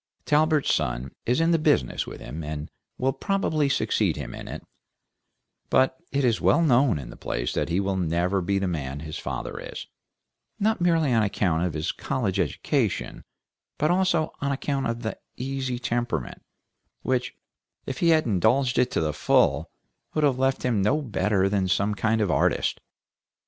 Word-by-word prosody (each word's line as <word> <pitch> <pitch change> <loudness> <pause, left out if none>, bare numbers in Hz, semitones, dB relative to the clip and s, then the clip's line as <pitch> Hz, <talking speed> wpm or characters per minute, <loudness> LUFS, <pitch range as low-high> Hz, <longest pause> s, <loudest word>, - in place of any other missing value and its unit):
Talbert's 155 -1 +3
son 65 -3 -1 0.2
is 125 +5 +2
in 165 +1 +3
the 165 - +3
business 150 - +1
with - - -8
him, 75 +7 -6
and 75 0 -5 0.3
will 130 +1 +1
probably 155 -3 0
succeed 105 - +1
him 70 -5 -6
in - - -8
it; - - -7 1.1
but 130 0 +3 0.2
it 140 -1 +1
is 115 -2 +2
well 170 - +4
known 130 - +4
in 60 -4 -7
the - - -10
place - - -3
that - - -1
he 85 +3 +1
will 100 -1 0
never 90 +2 +1
be 100 +3 0
the 95 0 0
man 70 -5 -3
his 75 0 -6
father - - -5
is, - - -7 0.7
not 215 -1 +1
merely 165 -6 +3
on 115 - +4
account 95 -5 +1
of 90 -4 -2
his 75 0 -1
college - - -2
education, - - -1 0.5
but 155 +3 +2
also 180 -3 +1
on 140 -1 0
account 140 0 -1
of 115 0 -3
the 110 - -4 0.2
easy 130 -1 -2
temperament, 120 - -2 0.6
which 130 -1 -1 0.5
if 130 -2 -5
he 170 - +3
had 160 -1 +4
indulged 120 +5 +2
it 125 0 +3
to - - 0
the 75 -1 0
full 75 - +2 0.5
would 155 - +1
have 135 -3 +2
left 135 0 +1
him 115 -5 +1
no 120 +10 +2
better 105 -7 +1
than 100 -1 +1
some 100 +3 +1
kind 110 +3 +1
of 100 -5 +1
artist. - - +1
115 Hz, 175 wpm, -25 LUFS, 90-140 Hz, 1.1 s, well